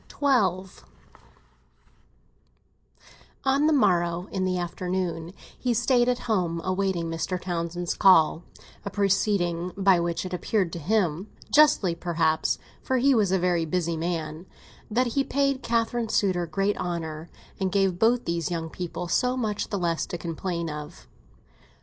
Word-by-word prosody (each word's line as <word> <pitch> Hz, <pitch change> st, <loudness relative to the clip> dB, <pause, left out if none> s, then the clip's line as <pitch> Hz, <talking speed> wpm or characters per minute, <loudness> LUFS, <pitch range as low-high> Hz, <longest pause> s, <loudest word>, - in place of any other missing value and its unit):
XII 195 Hz, -, +1 dB, 2.7 s
ON 275 Hz, +3 st, +3 dB
the -, -, +3 dB
morrow, 175 Hz, -, +2 dB
in 190 Hz, -1 st, -1 dB
the 185 Hz, -1 st, 0 dB
afternoon, 175 Hz, -1 st, -3 dB, 0.2 s
he 245 Hz, -2 st, -1 dB
stayed 240 Hz, +1 st, +3 dB
at 250 Hz, -, +1 dB
home, 180 Hz, -7 st, 0 dB
awaiting 185 Hz, -2 st, -1 dB
Mr. 165 Hz, +3 st, -3 dB
Townsend's 175 Hz, 0 st, -3 dB
call—a 175 Hz, +1 st, +2 dB
proceeding 195 Hz, -3 st, 0 dB
by 195 Hz, -2 st, +4 dB
which 170 Hz, +1 st, -2 dB
it 185 Hz, -, -6 dB
appeared 180 Hz, 0 st, -1 dB
to 170 Hz, -, -4 dB
him 180 Hz, 0 st, 0 dB, 0.3 s
(justly 295 Hz, -, +5 dB
perhaps, 165 Hz, -2 st, 0 dB, 0.2 s
for 260 Hz, -, 0 dB
he 270 Hz, +2 st, +4 dB
was 210 Hz, -6 st, +2 dB
a 190 Hz, -, +3 dB
very 175 Hz, -2 st, +1 dB
busy 170 Hz, 0 st, -1 dB
man) 165 Hz, 0 st, -4 dB, 0.4 s
that 240 Hz, +4 st, +2 dB
he 275 Hz, -, +2 dB
paid 275 Hz, -1 st, 0 dB
Catherine's 230 Hz, -1 st, 0 dB
suitor 180 Hz, -4 st, +1 dB
great 195 Hz, +5 st, 0 dB
honour, 165 Hz, -2 st, -4 dB, 0.3 s
and 190 Hz, -1 st, 0 dB
gave 195 Hz, -2 st, +1 dB
both 235 Hz, +2 st, +3 dB
these 170 Hz, -2 st, -1 dB
young 165 Hz, -2 st, -4 dB
people 175 Hz, 0 st, -5 dB
so 250 Hz, +9 st, +1 dB
much 215 Hz, -4 st, -2 dB
the 205 Hz, -, -2 dB
less 170 Hz, -3 st, -1 dB
to 175 Hz, -, -4 dB
complain 170 Hz, 0 st, -4 dB
of. 150 Hz, +3 st, -8 dB
180 Hz, 140 wpm, -26 LUFS, 170-210 Hz, 2.7 s, justly